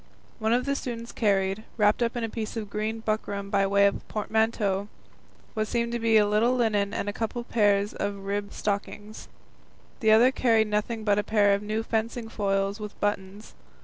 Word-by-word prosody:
One 220 0 0
of 245 +2 +2
the 280 0 0
students 235 -3 -5
carried, 195 -1 0
wrapped 210 +1 +3
up 235 +1 0
in 240 - -2
a - - 0
piece 225 0 -5
of 210 -2 -5
green 215 +2 -3
buckram 205 -2 -3
by 195 -1 +2
way 200 0 +4
of 200 - +2
a - - -12
portmanteau, 210 -2 -1 0.7
what 215 -1 -1
seemed 235 0 -1
to 235 - -2
be 225 -1 +4
a 210 - +5
little 220 +4 +2
linen 210 -5 +1
and 205 - -3
a 205 - -2
couple 225 +2 -3
of 240 - -15
pairs 205 -2 +2
of 205 - -3
ribbed 200 0 -3
stockings; 205 +1 -4 0.7
the 220 - +2
other 230 +4 +6
carried 225 -4 +2
nothing 215 +2 -1
but 205 -1 +2
a - - 0
pair 205 -2 +3
of 200 - 0
new 215 +2 -2
fencing 225 +1 -2
foils 195 -1 -1
with 210 -1 -8
buttons. 205 0 -3
215 Hz, 200 wpm, -26 LUFS, 205-225 Hz, 0.7 s, other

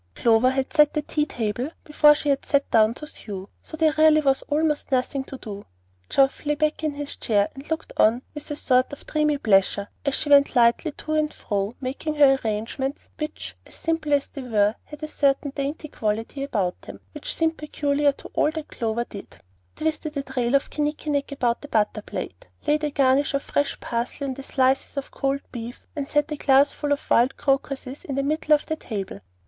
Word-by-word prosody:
Clover 230 +2 +4
had 265 +1 -2
set 300 -2 +5
the 300 - 0
tea 300 0 -1
table 240 +3 -2
before 300 -1 +5
she 290 -1 +1
sat 280 -1 +1
down 220 0 +4
to 300 - -8
sew, 200 -10 -8
so 315 - -9
there 315 -1 +3
really 310 0 +7
was 270 -2 +2
almost 300 0 0
nothing 265 +1 0
to 270 - -8
do. 205 -5 -7 0.5
Geoff 270 0 +2
lay 295 0 +1
back 305 +1 0
in 305 -1 0
his 290 0 -5
chair 205 -2 +2
and 270 +2 -11
looked 320 0 -3
on 235 +4 +4
with 295 -1 -7
a 295 - -3
sort 255 -3 +2
of 285 - -10
dreamy 300 -1 +1
pleasure 200 -3 +2
as 280 -2 +1
she 295 - -2
went 280 0 +6
lightly 240 +6 +4
to 310 - -5
and 310 0 +1
fro, 200 +2 -3
making 275 +4 -3
her 275 -2 +6
arrangements, 225 +6 -3
which, 305 0 -5
simple 325 -2 -2
as 280 -1 +2
they 275 - -7
were, 215 -4 +2
had 300 0 -11
a - - -2
certain 280 -1 +1
dainty 290 +3 -3
quality 225 +2 -3
about 205 -10 -1
them 100 0 -10
which - - -4
seemed 325 0 0
peculiar 290 -1 +1
to - - -12
all - - +3
that 315 -1 -6
Clover 230 0 -1
did, 200 - -10 0.4
twisted 310 -1 -2
a 280 - -1
trail 255 -1 0
of 275 - +1
kinnikinnick 295 -1 -1
about 245 -4 0
the 290 - -9
butter 215 -4 +1
plate, - - -7 0.2
laid 300 +1 +2
a 300 - +1
garnish 275 0 +2
of 280 - -1
fresh 285 0 -1
parsley 240 +4 -3
on 270 - -2
the 275 - -8
slices 265 +1 +1
of 275 - -4
cold 275 0 -1
beef, 235 0 -7
and 285 -2 -3
set 295 +2 +1
a 300 - -2
glass 275 0 +4
full 295 -1 -4
of 285 - -1
wild 245 +3 +4
crocuses 275 -1 -1
in 275 - -4
the 275 - 0
middle 305 +1 +3
of 295 - -3
the 315 - -2
table. 200 - -5
280 Hz, 205 wpm, -24 LUFS, 245-300 Hz, 0.5 s, really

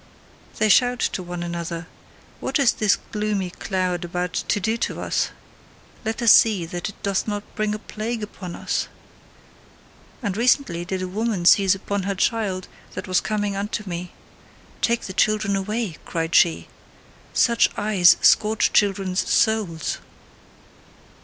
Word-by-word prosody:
They 215 - +2
shout 245 +4 +4 0.2
to - - -3
one 175 -1 -5
another: 170 0 -4 0.5
"What - - -1
is 275 -5 +4
this 210 -2 +2
gloomy 210 -3 -1
cloud 185 -2 -2
about 180 +1 -3
to - - -1
do 220 +4 0
to - - -3
us? - - 0 0.7
Let 225 +1 -3
us 230 - +7
see 205 -7 +5
that 175 +4 -4
it 200 - -15
doth 200 0 0
not 205 -1 -2
bring 215 -1 -1
a - - -4
plague 220 +1 -5
upon 185 -4 -7
us!" - - -2 1.4
And 200 -5 -1
recently 230 - +1
did 185 +1 -3
a - - -3
woman 205 -1 -2
seize 195 +1 +6
upon 200 +1 -3
her 200 - -1
child 195 -2 -1 0.3
that - - -5
was 185 -1 +2
coming 205 0 -2
unto 205 +1 -3
me: 175 0 -5 0.7
"Take 235 0 +2
the 190 - -7
children 215 0 +1
away," 210 -2 -2
cried 165 0 -3
she, 170 -2 +4 0.6
"such 235 -1 +3
eyes 205 -4 +5
scorch 215 +1 +4
children's 195 -2 +1
souls." 205 -8 +1
200 Hz, 145 wpm, -23 LUFS, 180-215 Hz, 1.4 s, us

